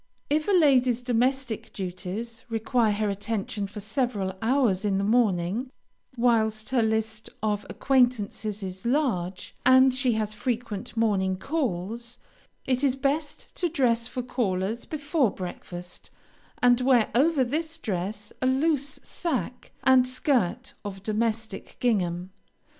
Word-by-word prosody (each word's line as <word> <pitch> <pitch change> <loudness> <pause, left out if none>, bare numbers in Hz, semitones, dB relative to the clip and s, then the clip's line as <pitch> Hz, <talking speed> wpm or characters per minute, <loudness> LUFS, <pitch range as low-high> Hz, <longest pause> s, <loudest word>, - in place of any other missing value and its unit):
If 305 +1 +2
a - - +2
lady's 260 - +4
domestic 250 0 0
duties 195 +5 -5
require 225 0 +1
her 205 0 0
attention 205 0 -3
for 210 +2 -8
several 215 -4 -1
hours 225 -5 +2
in 200 -2 +1
the 195 - 0
morning, 210 +1 +1 0.5
whilst 220 -2 +2
her 255 -3 +3
list 220 0 -1
of 210 -1 -1
acquaintances 225 -5 +1
is 190 0 -6
large, 230 - -1
and 260 +1 +6
she 255 -2 +1
has 215 -1 -1
frequent 225 -2 -3
morning 195 -4 +2
calls, 235 - -3 0.5
it 255 +1 0
is 265 -2 +3
best 285 +2 -2
to 350 - +1
dress 240 -7 +1
for 250 - -4
callers 220 -3 -1
before 300 -4 +1
breakfast, 180 -1 -8 0.5
and 245 0 +5
wear 250 -3 +4
over 280 +3 +4
this 315 +6 -2
dress 205 - -4
a 255 - +2
loose 280 +1 +1
sack 260 -6 -3
and 260 -1 +5
skirt 255 - 0
of 195 -2 -7
domestic 220 -1 -2
gingham. 185 -6 0
230 Hz, 130 wpm, -26 LUFS, 205-260 Hz, 0.5 s, and